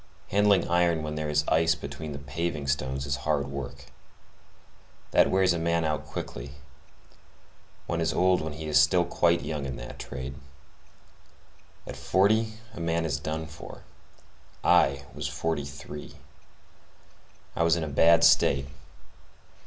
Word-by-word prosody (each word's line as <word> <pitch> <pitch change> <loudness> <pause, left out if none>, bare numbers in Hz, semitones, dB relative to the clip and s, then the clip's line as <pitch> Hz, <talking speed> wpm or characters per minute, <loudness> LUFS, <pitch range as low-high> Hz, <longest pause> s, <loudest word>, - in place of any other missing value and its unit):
Handling 100 -2 +3
iron 85 -2 +2
when 75 0 -4
there 75 0 -3
is 75 0 +1
ice 80 +1 +3
between 75 0 -7
the 70 - -5
paving 75 +2 -3
stones 65 -1 -1
is 70 0 -1
hard 70 +2 0
work. 70 -2 -7 1.3
That - - +5
wears 95 -1 +3
a 85 - -2
man 85 0 +1
out 75 -1 -2
quickly. 65 +3 -6 1.3
One 85 -1 -2
is 80 - +1
old 90 +1 +3
while 80 0 -4
he 80 +1 -7
is 75 -1 +5
still 85 +4 +3
quite 85 0 +2
young 75 -3 -3
in 65 -2 -4
that - - -9
trade. 65 +2 -6 1.5
At - - -7
forty 100 +10 +2 0.2
a 105 - -9
man 85 0 0
is 80 - -1
done 80 +1 -3
for. 80 -1 -11 0.8
I 70 0 +3
was - - -4
fifty 75 0 -2
three. 70 0 -9 1.4
I - - -1
was 85 0 +4
in 85 - -2
a - - -3
bad 80 +3 +5
state. 70 0 +4
80 Hz, 145 wpm, -27 LUFS, 70-85 Hz, 1.5 s, That